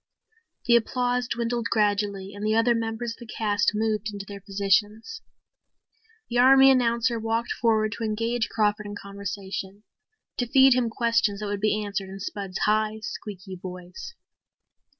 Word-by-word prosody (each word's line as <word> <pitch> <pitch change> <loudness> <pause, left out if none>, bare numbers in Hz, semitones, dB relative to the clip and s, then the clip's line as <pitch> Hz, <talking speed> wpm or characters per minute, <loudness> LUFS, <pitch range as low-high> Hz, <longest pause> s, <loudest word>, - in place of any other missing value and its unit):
The 235 - +5
applause 245 +1 +1
dwindled 235 0 -2
gradually 205 -2 0
and 205 +1 -8
the 215 +1 +1
other 230 +2 +4
members 225 0 -3
of - - -9
the 235 -3 -10
cast 205 -1 +1
moved 215 0 -1
into 200 -1 -7
their 200 0 -9
positions. 205 - 0 1.1
The 240 0 0
army 270 +1 +7
announcer 235 -2 +2
walked 225 +1 -1
forward 220 -2 +1
to - - -3
engage 230 +2 -1
Crawford 210 -1 0
in 205 - -6
conversation 200 0 -6 0.5
to 245 - -1
feed 265 +1 +6
him 245 -2 +1
questions 230 -3 +1
that 210 - -4
would 205 -1 -3
be 215 0 +1
answered 200 -1 -4
in 195 +1 -8
Spud's 195 -1 -5
high, 215 +1 +1
squeaky 190 -3 -7
voice. 185 - -9
215 Hz, 150 wpm, -25 LUFS, 200-235 Hz, 1.1 s, army